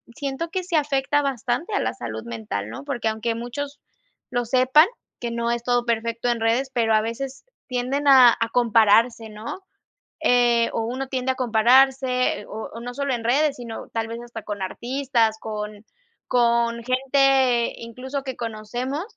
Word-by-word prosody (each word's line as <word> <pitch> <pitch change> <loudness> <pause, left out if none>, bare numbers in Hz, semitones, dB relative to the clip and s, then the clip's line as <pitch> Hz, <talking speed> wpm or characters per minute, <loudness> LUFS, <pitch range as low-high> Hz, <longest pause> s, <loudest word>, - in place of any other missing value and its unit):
siento 285 +3 -4
que 370 0 -3
sí 355 -1 -3
afecta 290 -1 +1
bastante 275 - -2
a - - +2
la - - -1
salud 110 -2 -6
mental, 110 -3 -5
¿no?, 115 - -8
porque 270 -6 -3
aunque 220 +1 -1
muchos 280 +5 -6 0.5
lo 245 -1 0
sepan, 260 +7 +5 0.3
que 235 -1 -4
no 235 0 -1
es 235 0 -2
todo 245 0 +1
perfecto 230 +1 -1
en 235 - 0
redes, 235 +4 +1
pero 225 -2 +2
a 215 - +4
veces 265 - -5 0.2
tienden 260 +3 -1
a 255 -3 +9
a 230 -1 0
compararse, 225 -1 +3
¿no?, 215 - -7 0.7
eh, 240 -1 +4
o 225 - -1
uno 260 +3 -4
tiende 260 0 -1
a - - -7
compararse, 255 +1 +3
o 220 +1 -7
o 230 - -8
no 245 +1 -6
sólo 280 0 -1
en 230 -1 -5
redes, 280 +4 +2
sino 235 -2 -8
tal 225 -1 -2
vez 230 +1 -6
hasta 235 -2 -8
con 205 -2 -5
artistas, 240 +1 0
con 210 -1 -6 0.4
con 235 -1 +2
gente 260 -1 +3
incluso 255 +4 -6
que 265 -2 -6
conocemos, 240 +6 -4
240 Hz, 170 wpm, -23 LUFS, 230-265 Hz, 0.7 s, a